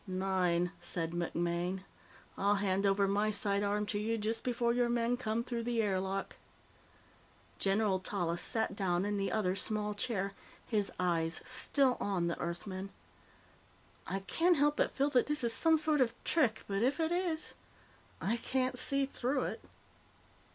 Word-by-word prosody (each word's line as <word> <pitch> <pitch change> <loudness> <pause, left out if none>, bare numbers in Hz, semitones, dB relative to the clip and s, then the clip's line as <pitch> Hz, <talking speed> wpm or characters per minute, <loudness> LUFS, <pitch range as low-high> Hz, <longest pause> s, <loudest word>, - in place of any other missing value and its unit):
"Nine," 185 -2 +1
said 165 -2 -3
MacMaine. 175 +2 -1 0.5
"I'll 200 +1 +2
hand 195 0 +1
over 195 0 +3
my 205 +2 +2
sidearm 205 0 +1
to 205 0 -2
you 225 +2 0
just 225 +1 -1
before 240 -1 +1
your 245 0 +2
men 235 0 +1
come 230 -2 -1
through 240 -1 -3
the 235 0 -1
air 200 -4 +2
lock." 195 +1 -3 1.2
General 195 -1 +2
Tallis 175 -3 -1
sat 220 -3 0
down 185 -2 0
in 205 0 -1
the 195 0 -1
other 190 -4 +1
small 210 +1 -1
chair, 200 -2 -2 0.3
his 210 -3 0
eyes 170 -2 +1
still 270 -3 +1
on 190 -4 0
the 170 - -2
Earthman. 185 +3 -4 1.2
"I 195 - -2
can't 330 - +2
help 295 +1 +3
but - - +2
feel 280 +2 +1
that 250 -3 +3
this 295 -2 -1
is 235 -1 +2
some 320 +6 +5
sort 305 -2 +2
of 235 -2 +2
trick, 250 -9 +2
but 195 0 -1
if 265 +7 +2
it 320 0 +1
is, 345 -3 -1 0.7
I 225 +5 0
can't 255 +1 -1
see 275 0 0
through 265 0 -1
it. - - -4
210 Hz, 160 wpm, -33 LUFS, 190-245 Hz, 1.2 s, some